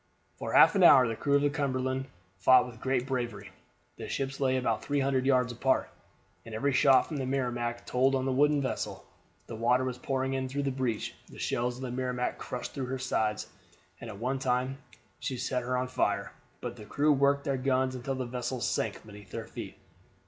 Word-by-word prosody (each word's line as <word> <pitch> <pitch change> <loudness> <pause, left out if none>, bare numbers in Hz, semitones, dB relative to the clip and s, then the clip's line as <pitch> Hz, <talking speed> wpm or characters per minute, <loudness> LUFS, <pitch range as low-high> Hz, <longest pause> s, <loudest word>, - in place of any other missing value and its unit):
For - - -4
half - - +8
an 195 - +2
hour 135 -8 +8
the 115 - -2
crew 140 +4 +1
of 140 - +3
the 145 - +2
Cumberland 130 -2 -1 0.3
fought 125 +6 +6
with 120 -3 -10
great 130 -1 0
bravery. 120 -7 -3 0.5
The - - -7
ships 135 0 -3
lay 130 -1 +2
about 115 -4 0
three 145 0 0
hundred 135 -1 +1
yards 125 -2 +3
apart, 130 +3 +1 0.5
and 115 -1 -8
every 140 +5 0
shot 130 -1 +6
from 155 - -5
the 135 - -2
Merrimac 120 -3 -2
told 130 +2 +2
on 130 0 0
the 135 - 0
wooden 145 +2 +3
vessel. 130 - -4 0.4
The - - -7
water 120 +3 +2
was 130 -1 -3
pouring 135 0 -1
in 130 -1 -2
through 140 +2 -2
the 140 - 0
breach. 130 -4 -2 0.2
The - - -13
shells 120 +1 -1
of 130 - -8
the 125 - -4
Merrimac 125 0 -2
crushed 125 - -5
through 135 -3 -3
her 130 +1 -2
side, 110 -4 -1 0.6
and 120 - -8
at 105 - -8
one 130 +5 -2
time 130 +1 0 0.4
set 125 0 -2
her 125 +1 -1
on 125 0 -1
fire; 125 - -1 0.3
but - - -5
the 105 - -10
crew 150 +6 +2
worked 140 0 +2
their 140 -1 -1
guns 130 0 +1
until 130 +2 -3
the 130 -1 -3
vessel 125 +1 -3
sank 110 -2 -2
beneath 105 -2 -12
their - - -5
feet. - - -8
130 Hz, 205 wpm, -29 LUFS, 120-135 Hz, 0.6 s, half